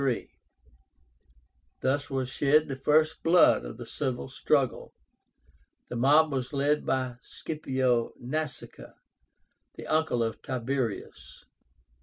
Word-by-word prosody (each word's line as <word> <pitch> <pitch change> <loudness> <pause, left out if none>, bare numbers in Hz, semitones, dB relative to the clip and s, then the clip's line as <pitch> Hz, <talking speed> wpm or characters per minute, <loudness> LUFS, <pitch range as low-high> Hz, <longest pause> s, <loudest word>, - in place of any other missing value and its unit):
Thus 140 +2 0
was 135 -2 -2
shed 145 +4 +2
the 135 - -4
first 155 +4 +2
blood 170 - +5
of - - -8
the - - -8
civil 130 -3 -3
struggle. 135 -1 0 0.9
The - - -5
mob 145 +6 +4
was 130 0 -3
led 145 +2 +1
by 130 -2 -1
SCIPIO 130 -7 -1
NASÍCA, 140 +1 -5 0.8
the - - -9
uncle 155 -7 +1
of 115 -1 -4
Tiberius. 130 -3 -4
135 Hz, 105 wpm, -28 LUFS, 125-150 Hz, 0.9 s, blood